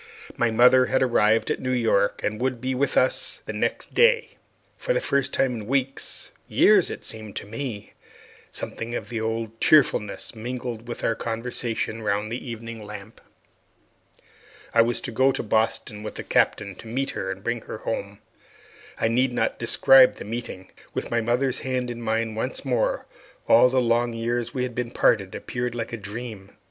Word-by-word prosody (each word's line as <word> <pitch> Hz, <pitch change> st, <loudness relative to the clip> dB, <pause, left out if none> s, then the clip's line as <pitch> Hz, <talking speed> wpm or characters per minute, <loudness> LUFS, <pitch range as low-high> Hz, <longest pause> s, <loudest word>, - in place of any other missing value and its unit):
My 120 Hz, -, +2 dB
mother 125 Hz, +3 st, +5 dB
had 130 Hz, -, +2 dB
arrived 110 Hz, -3 st, +3 dB
at -, -, -1 dB
New 130 Hz, -, -3 dB
York, 115 Hz, -5 st, +1 dB
and 105 Hz, +2 st, -2 dB
would 130 Hz, -2 st, -1 dB
be 130 Hz, +2 st, -2 dB
with 135 Hz, +2 st, 0 dB
us 130 Hz, -, +1 dB
the -, -, -5 dB
next -, -, -2 dB
day. 475 Hz, -1 st, +4 dB, 0.5 s
For -, -, -1 dB
the -, -, +1 dB
first 140 Hz, -, 0 dB
time 130 Hz, -2 st, +1 dB
in 110 Hz, -3 st, -6 dB
weeks 135 Hz, +1 st, -2 dB, 0.2 s
years, -, -, +5 dB
it -, -, -7 dB
seemed 110 Hz, -2 st, -6 dB
to -, -, -5 dB
me 115 Hz, -1 st, -6 dB, 0.6 s
something 115 Hz, +1 st, -4 dB
of -, -, -5 dB
the 115 Hz, -2 st, -3 dB
old 115 Hz, 0 st, -3 dB
cheerfulness 125 Hz, -9 st, +3 dB
mingled 120 Hz, 0 st, -5 dB
with 120 Hz, -, -6 dB
our 115 Hz, -, +2 dB
conversation 115 Hz, -1 st, -2 dB
round 105 Hz, 0 st, -1 dB
the 125 Hz, +1 st, -5 dB
evening 115 Hz, -1 st, -7 dB
lamp. 105 Hz, +1 st, -10 dB, 1.5 s
I 115 Hz, -, +6 dB
was 120 Hz, +1 st, 0 dB
to 125 Hz, -, -5 dB
go 130 Hz, +4 st, +3 dB
to -, -, -2 dB
Boston 110 Hz, -1 st, 0 dB
with 105 Hz, -, -7 dB
the -, -, -5 dB
Captain 100 Hz, -1 st, +1 dB
to -, -, -11 dB
meet 135 Hz, +4 st, -2 dB
her 95 Hz, -, -4 dB
and 95 Hz, 0 st, -5 dB
bring 115 Hz, 0 st, -1 dB
her -, -, -7 dB
home. 100 Hz, -2 st, -4 dB, 0.8 s
I -, -, +1 dB
need 125 Hz, +3 st, +2 dB
not 120 Hz, -, -1 dB
describe 135 Hz, -1 st, +6 dB
that -, -, -9 dB
meeting. 105 Hz, -4 st, -6 dB, 0.2 s
With -, -, -3 dB
my 115 Hz, -1 st, +2 dB
mother's 125 Hz, +3 st, 0 dB
hand 125 Hz, -1 st, -2 dB
in 120 Hz, 0 st, -7 dB
mine 115 Hz, 0 st, -1 dB
once 125 Hz, +6 st, -3 dB
more, 125 Hz, -4 st, 0 dB, 0.4 s
all 125 Hz, +2 st, +7 dB
the 130 Hz, 0 st, +2 dB
long 120 Hz, 0 st, +1 dB
years 120 Hz, +1 st, -2 dB
we 125 Hz, 0 st, -2 dB
had 125 Hz, -1 st, -3 dB
been 120 Hz, 0 st, -3 dB
parted 100 Hz, -5 st, +2 dB
appeared 120 Hz, -1 st, -4 dB
like 115 Hz, 0 st, -4 dB
a -, -, -2 dB
dream. 105 Hz, -1 st, -8 dB
115 Hz, 180 wpm, -25 LUFS, 110-125 Hz, 1.5 s, all